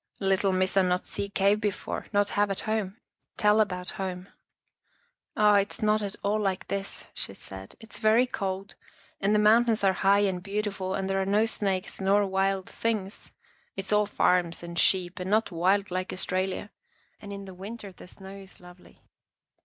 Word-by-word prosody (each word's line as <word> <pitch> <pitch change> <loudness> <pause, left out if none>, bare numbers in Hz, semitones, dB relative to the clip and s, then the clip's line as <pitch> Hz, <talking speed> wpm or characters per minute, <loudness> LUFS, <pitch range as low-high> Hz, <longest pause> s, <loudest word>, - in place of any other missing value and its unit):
" - - -38
Lit 190 -1 +3
tle 195 -1 +2
Missa 185 +1 +2
not 180 -1 0
see 200 - -4
cave 200 +1 +2
before, 205 -2 -3
not 205 -1 +2
have 205 0 +1
at 195 - -2
home. 215 -2 -2 0.4
Tell 210 +1 +4
about 180 -3 -2
home." 185 0 -4 0.5
" 485 +1 -33
Oh, 210 -1 +5
it's 200 +2 +1
not 215 0 +3
at 205 -1 -3
all 210 +2 +1
like 195 -3 -2
this," 200 0 -2
she - - -5
said. 95 0 -10
" - - -47
It's 225 - -8
very 220 +3 +4
cold, 195 -4 -4 0.5
and 205 +2 +2
the - - +5
mountains 220 +1 +4
are 190 -1 +4
high 195 +2 +3
and 190 -3 0
beau 200 +3 -2
tiful 190 -2 -3
and 195 -1 -2
there 195 0 0
are - - -1
no 210 +3 +3
snakes 195 -4 -2
nor 200 +2 +3
wild 195 0 0
things. 215 -4 -3 0.4
It's 195 +1 -3
all 210 0 +3
farms 175 -4 +1
and 170 0 -4
sheep 185 0 +2
and 180 +1 -4
not 220 +1 +2
wild 190 +4 +1
like 185 +1 -2
Aus 185 - -2
tralia. 190 +2 -2 0.5
And 205 - -8
in 200 0 -7
the 190 - -9
winter 200 +2 -8
the 180 - -14
snow 190 +1 -10
is 195 -1 -13
lovely." 180 0 -17
195 Hz, 195 wpm, -27 LUFS, 185-210 Hz, 0.5 s, Oh